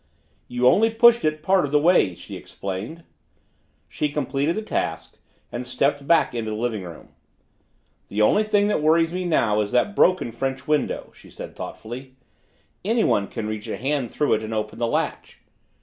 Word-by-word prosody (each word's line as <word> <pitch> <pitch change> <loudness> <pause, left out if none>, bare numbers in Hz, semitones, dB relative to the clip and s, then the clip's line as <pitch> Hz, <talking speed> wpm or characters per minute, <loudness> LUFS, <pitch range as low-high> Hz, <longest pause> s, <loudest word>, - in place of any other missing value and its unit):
"You 125 0 -1
only 225 - +5
pushed 235 +1 +5
it 155 0 -1
part 190 -1 +3
of 145 - -3
the 150 - +4
way," 150 - +3
she - - -10
explained. 100 - -6 0.8
She 150 - -2
completed 145 +2 -1
the 220 - -3
task - - -3 0.3
and 120 - -4
stepped 140 +3 -1
back 170 -5 +3
into 115 -2 -3
the 105 - -3
living 115 -2 -2
room. 85 -3 -10 1.0
"The 105 - -4
only 205 - +4
thing 205 -1 +2
that 205 - +1
worries 165 +2 +3
me 185 0 -2
now 110 -11 +2
is 105 - -3
that 205 +11 +2
broken 185 -10 +3
French 135 +3 -4
window," 150 -1 -1
she - - -17
said - - -9
thoughtfully. 130 +4 -8 0.7
"Anyone 210 - +2
can 115 -3 -5
reach 110 -1 -5
a - - -4
hand 135 -1 -1
through 150 - +1
it 110 - +1
and 110 0 -4
open 110 +1 -4
the 120 - +1
latch." - - -3
135 Hz, 180 wpm, -23 LUFS, 110-170 Hz, 1.0 s, only